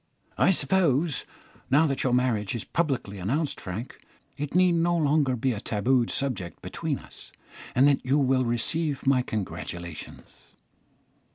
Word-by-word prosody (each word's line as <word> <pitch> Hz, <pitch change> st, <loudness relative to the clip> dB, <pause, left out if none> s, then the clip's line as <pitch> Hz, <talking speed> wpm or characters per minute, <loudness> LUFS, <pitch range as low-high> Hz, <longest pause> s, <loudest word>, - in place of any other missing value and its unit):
"I -, -, +5 dB
suppose, 170 Hz, -6 st, +2 dB, 0.4 s
now 150 Hz, +5 st, +5 dB
that 140 Hz, -3 st, -1 dB
your 130 Hz, -, +1 dB
marriage 120 Hz, -4 st, +1 dB
is 115 Hz, -, -4 dB
publicly 135 Hz, -, -2 dB
announced, 140 Hz, -, -1 dB
Frank, 105 Hz, +7 st, -6 dB, 0.4 s
it 145 Hz, +2 st, -5 dB
need 180 Hz, 0 st, +5 dB
no 170 Hz, +1 st, +2 dB
longer 145 Hz, -4 st, +2 dB
be 125 Hz, +2 st, 0 dB
a 105 Hz, -, -4 dB
tabooed 120 Hz, +3 st, +1 dB
subject 125 Hz, -11 st, -2 dB
between -, -, -3 dB
us, -, -, -11 dB, 0.4 s
and 130 Hz, +3 st, +6 dB
that 140 Hz, -2 st, +2 dB
you 135 Hz, +3 st, +2 dB
will 130 Hz, -2 st, +2 dB
receive 140 Hz, +5 st, 0 dB
my 135 Hz, -2 st, +4 dB
congratulations." 85 Hz, -7 st, -7 dB
130 Hz, 145 wpm, -26 LUFS, 115-150 Hz, 0.4 s, and